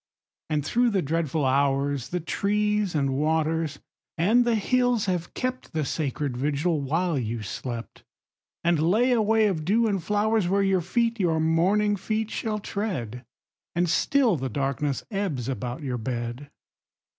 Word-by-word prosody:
And 150 -2 0
through 240 +6 +2
the 195 -4 0
dreadful 155 -1 0
hours 140 0 +1
The 180 - -1
trees 210 +2 0
and 140 -2 +1
waters 155 +1 0 0.4
and 220 +9 +4
the 235 -1 +2
hills 245 +1 +2
have 180 -3 -2
kept 255 0 -3
The 155 -2 0
sacred 140 -3 -2
vigil 150 +4 0
while 160 +2 0
you 115 -2 -3
slept, 115 +3 -6 0.6
And 170 -2 +2
lay 215 +11 +3
a 240 -2 +3
way 220 +1 +3
of 180 -7 0
dew 215 +8 +2
and 195 -5 0
flowers 210 0 +1
Where 200 +1 +2
your 195 -2 +2
feet, 230 +6 0
your 165 -4 +2
morning 185 +6 +2
feet, 215 +2 -2
shall 215 -1 -2
tread. 160 - -4 0.5
And 175 +1 +2
still 240 - +2
the 130 -1 -3
darkness 140 +2 -1
ebbs 185 - -2
about 125 +1 -4
your 125 -3 -2
bed. 120 +3 -4
165 Hz, 155 wpm, -26 LUFS, 140-210 Hz, 0.6 s, and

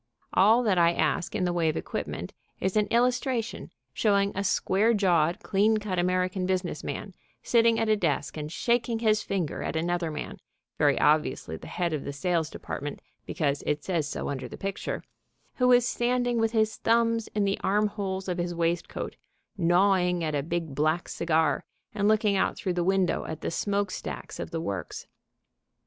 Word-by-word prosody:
All 220 +6 +5
that 195 -6 +2
I 170 0 +5
ask 160 +1 0
in - - 0
the 175 - 0
way 170 -2 +2
of 155 - -2
equipment - - -4 0.3
is 190 +1 -1
an 210 -1 +3
illustration 245 -1 0 0.2
showing 200 -2 +2
a 200 - -1
square 205 +4 +2
jawed, 175 -5 +2
clean 215 +2 +3
cut 205 -4 -2
American 185 +1 0
business 185 -4 -2
man 195 - -5 0.3
sitting 230 -1 +4
at 225 - +1
a 215 - +4
desk 210 - -1
and 150 -1 -5
shaking 235 +3 +1
his 215 -2 +2
finger 185 -7 -2
at - - -3
another 170 +1 0
man, 150 -1 -6 0.4
very - - +3
obviously 80 - +2
the - - -10
head 175 -2 -2
of 150 - -2
the 140 - -5
sales 165 +1 0
department 145 -2 -6 0.3
because 145 -4 -1
it 150 0 0
says 170 -6 -1
so - - -4
under 130 -3 -4
the - - -9
picture, 195 0 -4 0.5
who 250 -1 +4
is 245 -1 +5
standing 245 0 +1
with 225 0 +2
his 220 -1 +1
thumbs 230 -1 +2
in 210 - +2
the 195 0 0
arm 210 +2 +2
holes 195 -2 -3
of 180 -1 -2
his 175 0 -2
waistcoat, 170 0 -2 0.4
gnawing 180 -1 +3
at 155 -1 -1
a 145 - +1
big, 165 0 -3
black 155 +5 0
cigar, 160 -3 +1 0.3
and 205 -1 +1
looking 215 -1 +3
out 190 - +1
through 185 -5 -2
the 175 0 0
window 190 0 +1
at 160 0 -6
the - - -2
smoke 200 +2 -1
stacks - - -6
of - - -4
the 165 - -3
works. 95 - -5
185 Hz, 185 wpm, -27 LUFS, 165-215 Hz, 0.5 s, All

